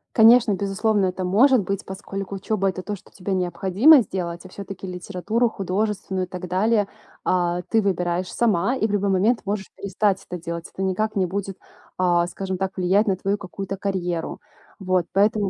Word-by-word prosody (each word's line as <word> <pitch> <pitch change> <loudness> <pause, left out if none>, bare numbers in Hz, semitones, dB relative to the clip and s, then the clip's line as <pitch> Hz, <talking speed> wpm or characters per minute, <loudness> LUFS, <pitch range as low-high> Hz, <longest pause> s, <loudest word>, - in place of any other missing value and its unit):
Конечно, 230 -1 +7
безусловно 200 +1 +1
это 185 0 -2
может 235 +6 +4
быть, 195 +2 -3
поскольку 195 0 -6
учеба 195 0 0
это 185 0 -4
то, 205 +2 -4
что - - -18
тебе 190 0 -4
необходимо 190 - +5
сделать, 175 -4 -4
а - - -10
все-таки 195 -1 -8
литературу 200 +6 -1
художественную 195 -1 -2
и - - -24
так 180 0 -6
далее, 205 +3 +2 0.4
а, 175 -1 +1
ты 225 - +3
выбираешь 180 -2 -1
сама 225 +1 +2
и 225 -4 +1
в - - -4
любой 200 -1 +1
момент 205 +6 +2
можешь 200 0 -3
перестать 195 0 -1
это 180 -2 -6
делать. 170 +1 -5
Это - - -6
никак 195 +3 -1
не 190 -2 +1
будет, 195 +1 -4 0.4
а, 175 -1 +3
скажем 190 +1 -4
так, 190 0 -3
влиять 190 +3 +3
на 190 - +1
твою 195 +2 -1
какую-то 195 0 -6
карьеру. 180 -4 -3 0.4
Вот. 185 -3 +1
Поэтому 205 0 +2
195 Hz, 180 wpm, -23 LUFS, 185-205 Hz, 0.4 s, Конечно